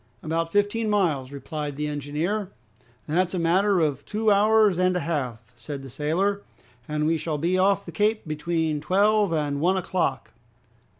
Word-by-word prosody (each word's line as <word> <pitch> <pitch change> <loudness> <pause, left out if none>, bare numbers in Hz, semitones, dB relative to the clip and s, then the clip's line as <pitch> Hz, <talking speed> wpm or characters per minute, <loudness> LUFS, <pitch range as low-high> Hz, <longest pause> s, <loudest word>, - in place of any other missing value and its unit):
"About 165 0 -1
fifteen 205 +3 +1
miles," 160 -11 +1
replied 145 0 -5
the 150 +1 -3
engineer. 150 +8 -2 0.6
"That's 180 +4 0
a - - -1
matter 185 +3 +2
of 145 -3 0
two 215 0 0
hours 210 -2 +4
and 185 0 +2
a 180 - 0
half," 125 -8 -4
said 135 +4 -7
the 135 - -10
sailor, 185 +9 0 0.5
"and 150 0 -1
we 165 +1 +2
shall 155 -1 -3
be 170 +5 0
off 195 +1 +2
the - - -7
Cape 215 -2 0
between 155 0 -1
twelve 205 +2 +3
and 145 -3 -1
one 185 +3 +2
o'clock. 175 -7 -2
165 Hz, 165 wpm, -25 LUFS, 150-200 Hz, 0.6 s, hours